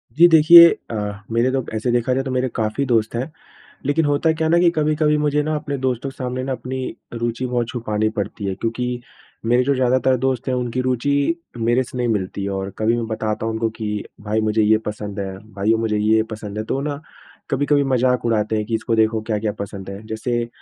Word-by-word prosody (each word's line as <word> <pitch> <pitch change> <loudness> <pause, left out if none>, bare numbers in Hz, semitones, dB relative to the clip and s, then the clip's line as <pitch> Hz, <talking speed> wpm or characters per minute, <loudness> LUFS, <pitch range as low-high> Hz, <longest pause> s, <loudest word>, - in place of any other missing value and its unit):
जी 170 +2 +8
देखिए 170 +1 +9 0.2
अ, - - -3 0.4
मेरे 120 +3 +2
तो 135 0 0
अब - - -10
ऐसे 110 +3 -1
देखा 120 +1 +1
जाए 135 - 0
तो 135 - -4
मेरे 130 0 0
काफ़ी 110 +5 -1
दोस्त 115 -3 +1
हैं। 130 +6 -3 0.5
लेकिन 145 +3 +2
होता 145 +3 +2
क्या 160 0 -1
है - - +1
ना 170 - +5
कि 175 0 +5
कभी-कभी 150 0 +2
मुझे 150 0 +1
ना 155 +1 -1
अपने 145 -2 -3
दोस्तों 130 0 -2
के 135 - -14
सामने 130 -1 -3
ना 135 - -3
अपनी 130 0 -4 0.3
रूचि 120 +1 -2
बहुत 120 -2 -1
छुपानी 110 -3 -1
पड़ती 105 -1 -4
है 95 - -1
क्योंकि, 120 +4 -3 0.4
मेरे 120 +2 +3
जो 140 +2 +1
ज़्यादातर 130 0 +2
दोस्त 130 0 -1
हैं 130 - +1
उनकी 125 0 -1
रूचि 140 +5 +1 0.2
मेरे 120 +3 +2
से 125 - -9
नहीं 120 -1 0
मिलती 100 -3 -2
है। 100 - -2
और 95 0 -3
कभी 110 +2 +2
मैं 115 - -2
बताता 110 -1 -2
हूँ 115 - -1
उनको 110 0 0
कि 105 -2 -4 0.2
भाई 105 +1 -1
मुझे 110 0 +1
ये 110 +1 +4
पसंद 105 -1 -5
है, 95 -1 -4 0.2
भाइयों 105 +3 +1
मुझे 110 -2 0
ये 110 +1 +3
पसंद 105 -1 -6
है। 110 - -2
तो 130 - -2
ना 145 0 -4 0.5
कभी-कभी 145 +1 +2
मज़ाक 125 -2 +1
उड़ाते 110 -1 +1
हैं 105 - -1
कि 115 +1 -1
इसको 115 +1 -1
देखो 110 0 +2
क्या-क्या 110 -1 -1
पसंद 100 -1 -6
है। 100 +1 -7
जैसे 120 +2 -2
120 Hz, 225 wpm, -21 LUFS, 110-135 Hz, 0.5 s, देखिए